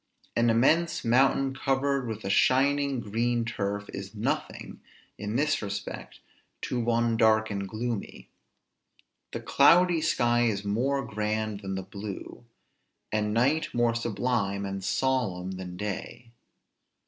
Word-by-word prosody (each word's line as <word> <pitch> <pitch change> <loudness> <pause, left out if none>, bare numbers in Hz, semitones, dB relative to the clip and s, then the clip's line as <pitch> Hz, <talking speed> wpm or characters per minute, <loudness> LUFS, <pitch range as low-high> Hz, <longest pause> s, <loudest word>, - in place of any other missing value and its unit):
An 115 0 +3
immense 155 +9 +2
mountain 135 +2 +3
covered 135 -1 0
with 110 -2 -5
a - - -2
shining 140 +2 +3
green 115 +2 0
turf, 105 -2 -3
is - - -7
nothing, - - -3 0.4
in 105 +2 -4
this 145 +3 +1
respect, 100 -1 -6 0.4
to 125 - -2
one 115 -1 +1
dark 110 -1 +3
and 100 -1 -3
gloomy; 115 0 -4 1.0
the - - -4
cloudy 170 +3 +4
sky 120 -6 +2
is 100 -2 -2
more 130 +6 0
grand 110 -1 -2
than 95 -1 -5
the 95 - -4
blue; 100 +3 -8 0.7
and 105 -1 0
night 135 +8 +1
more 120 -1 +3
sublime 115 -3 -1
and 95 0 -5
solemn 100 -8 0
than 90 -1 -7
day. 105 +4 -6
115 Hz, 125 wpm, -28 LUFS, 105-130 Hz, 1.0 s, cloudy